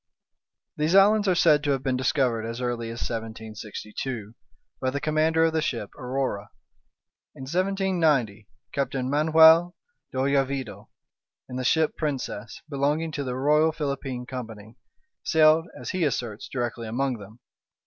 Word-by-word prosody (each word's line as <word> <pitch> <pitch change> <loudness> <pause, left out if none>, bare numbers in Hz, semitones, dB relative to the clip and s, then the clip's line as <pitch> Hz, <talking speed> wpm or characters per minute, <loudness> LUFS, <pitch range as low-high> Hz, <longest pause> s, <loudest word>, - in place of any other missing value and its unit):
These 155 +4 +1
islands 205 +1 +5
are 185 - +3
said 155 -4 +4
to 145 - -1
have 135 -2 0
been 130 -1 0
discovered 125 -3 +1
as 115 +1 -5
early 120 -2 -2
as 115 +1 -6
1762, 110 0 -6 0.5
by 130 - +1
the 140 +2 -2
commander 155 +2 +2
of 165 -1 +2
the 160 - +1
ship 115 -8 -3
Aurora. 125 -5 -3 0.9
In - - -9
1790, 165 - 0 0.3
Captain 135 -2 -1
Manuel 160 +3 +6 0.4
de - - -6
Oyarvido, 135 -2 -1 0.6
in 125 - -6
the 130 - -2
ship 160 +4 +2
Princess, 130 -7 -4
belonging 150 +3 -1
to 145 -1 -3
the 125 -2 -3
Royal 150 +4 +3
Philippine 140 -5 -4
Company, 110 -4 -8 0.5
sailed, 160 +1 +4
as - - -5
he 185 -2 -1
asserts, 120 -7 -2
directly 120 -2 -3
among 125 +1 -1
them. 105 +3 -13
135 Hz, 140 wpm, -25 LUFS, 120-155 Hz, 0.9 s, Manuel